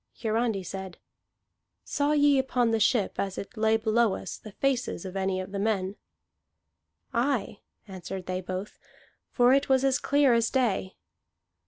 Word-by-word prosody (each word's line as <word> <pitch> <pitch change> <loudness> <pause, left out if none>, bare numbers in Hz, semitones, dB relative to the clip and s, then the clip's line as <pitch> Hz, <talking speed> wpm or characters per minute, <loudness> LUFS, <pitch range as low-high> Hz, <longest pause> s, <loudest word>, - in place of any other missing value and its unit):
Hiarandi 225 -3 0
said: 190 0 -7 0.9
"Saw 290 +1 0
ye 290 -2 +4
upon 250 -3 +1
the 225 - +1
ship, 215 -1 +1
as 195 -1 -2
it 200 - -7
lay 220 0 +3
below 220 -1 +2
us, - - -6
the 215 - -12
faces 255 -7 -1
of 185 0 -7
any 190 -1 -1
of 185 +1 -6
the 200 - -3
men?" 200 -2 -1 1.2
"Aye," 240 -4 0 0.3
answered 190 -1 -7
they 185 0 -3
both, 185 +2 -6 0.5
"for 245 0 +4
it 275 +1 +2
was 265 0 +4
as 265 -1 +2
clear 280 -3 +3
as 230 -1 +2
day." 215 -8 0
220 Hz, 155 wpm, -27 LUFS, 195-255 Hz, 1.2 s, ye